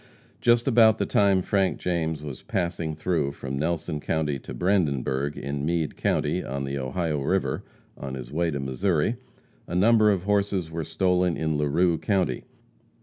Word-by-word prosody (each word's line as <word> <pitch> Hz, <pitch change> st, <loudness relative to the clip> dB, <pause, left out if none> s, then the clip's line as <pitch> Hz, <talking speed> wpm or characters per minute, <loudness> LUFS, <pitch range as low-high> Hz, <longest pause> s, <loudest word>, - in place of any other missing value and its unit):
Just 120 Hz, +1 st, +3 dB
about 110 Hz, -3 st, +6 dB
the -, -, 0 dB
time 100 Hz, -2 st, +3 dB
Frank 95 Hz, -1 st, +1 dB
James 80 Hz, -4 st, -2 dB
was 70 Hz, -4 st, -7 dB
passing 85 Hz, -3 st, -2 dB
through 80 Hz, -3 st, -1 dB
from 70 Hz, -1 st, -5 dB
Nelson 80 Hz, -1 st, -2 dB
county 75 Hz, -2 st, -1 dB
to -, -, -10 dB
Brandenburg, 70 Hz, -7 st, 0 dB
in 70 Hz, 0 st, -4 dB
Meade 80 Hz, 0 st, -1 dB
county, -, -, 0 dB
on 70 Hz, +1 st, -4 dB
the 70 Hz, 0 st, -3 dB
Ohio 75 Hz, +3 st, -2 dB
river, 95 Hz, +7 st, 0 dB, 0.3 s
on 65 Hz, -1 st, -6 dB
his 65 Hz, -2 st, -8 dB
way 85 Hz, +2 st, 0 dB
to 70 Hz, -3 st, -3 dB
Missouri, 80 Hz, -, 0 dB, 0.5 s
a 85 Hz, -, -5 dB
number 110 Hz, +3 st, +5 dB
of 95 Hz, -4 st, +1 dB
horses 100 Hz, -4 st, 0 dB
were 80 Hz, 0 st, -3 dB
stolen 90 Hz, +2 st, +1 dB
in 80 Hz, -1 st, -1 dB
Larue 80 Hz, +4 st, +2 dB
county. 95 Hz, -, 0 dB
80 Hz, 160 wpm, -26 LUFS, 70-95 Hz, 0.5 s, about